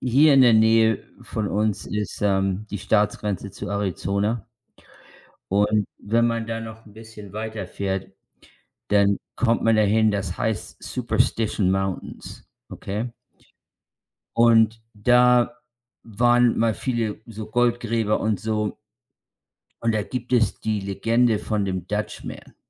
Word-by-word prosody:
hier 140 +4 +5
in 135 - +7
der 120 - +6
Nähe 110 0 +4 0.2
von 105 -2 -3
uns 105 0 -1
ist, 105 0 -4
ähm, 95 0 0
die 105 - -4
Staatsgrenze 105 -1 0
zu 100 - -7
Arizona 100 +2 -1 1.1
und 105 +1 +2
wenn 115 +3 +1
man 115 -1 -1
da 115 0 -4
noch 110 0 -9
'n 105 - -16
bisschen 110 -2 -12
weiterfährt, 100 -3 -4 0.8
dann 100 -1 +3 0.2
kommt 115 -1 +1
man 115 -1 +3
dahin, 110 +1 +3
das 100 -3 -3
heißt 110 -3 -3
Superstition 105 -4 0
Mountains, 95 -1 -4 0.2
okay? 110 +5 -5 1.2
Und 115 -1 +4
da 125 +3 +4 0.5
waren 120 +2 +3
mal 115 -1 +2
viele 115 -2 -2
so 110 -2 -8
Goldgräber 115 -2 +1
und 110 -2 0
so 105 -2 -2 1.0
und 115 -1 +1
da 110 - +1
gibt 125 +3 -5
es 115 -4 +2
die 110 -2 -1
Legende 110 +4 +1
von 105 -3 -1
dem 95 -2 -4
Dutch 105 +1 -3
Man. - - -9
110 Hz, 125 wpm, -23 LUFS, 100-115 Hz, 1.2 s, in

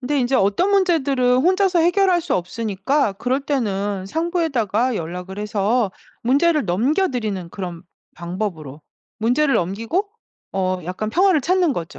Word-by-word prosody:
근데 280 +2 -1
인제 255 +1 +1
어떤 205 - +2
문제들은 280 -10 +2
혼자서 370 +3 +3
해결할 355 +1 +3
수 350 - -1
없으니까 210 +6 -1
그럴 250 +7 -1
때는 205 -8 -2
상부에다가 260 - 0
연락을 180 +4 -6
해서 210 +1 0 0.3
문제를 290 +5 +2
넘겨드리는 220 - 0
그런 175 -3 -6 0.3
방법으로 170 -5 -5 0.4
문제를 260 +6 +2
넘기고 225 - -1 0.4
어 185 -1 -1
약간 185 +5 -4
평화를 365 - +3
찾는 355 0 +2
거죠. 165 -8 -6
240 Hz, 325 characters per minute, -21 LUFS, 195-315 Hz, 0.4 s, 혼자서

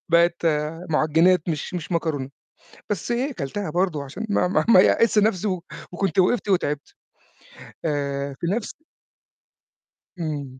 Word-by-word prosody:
بقت 170 0 +3 0.4
مُعجنات 160 +3 +3
مش 155 +1 -3
مش 175 0 -4
مكرونة، 155 -5 -1 0.6
بس 205 +3 -2
إيه 255 +5 0
كَلتها 175 - -4
برضه، 170 -3 0
عشان 145 +11 -6
ما 205 - +2
ما 180 - +1
ما 210 - +8
يأسش 220 +3 +4
نفسي، 210 -1 +2
و 185 -3 -2 0.3
وكنت 190 -1 -1
وقفت، 205 +4 +2
وتعبت. 150 -6 -1 0.9
آآ 140 -2 -2
في - - -2
نفس 205 +5 -2 1.5
إمم. 145 -5 -4
170 Hz, 130 wpm, -23 LUFS, 150-195 Hz, 1.5 s, ما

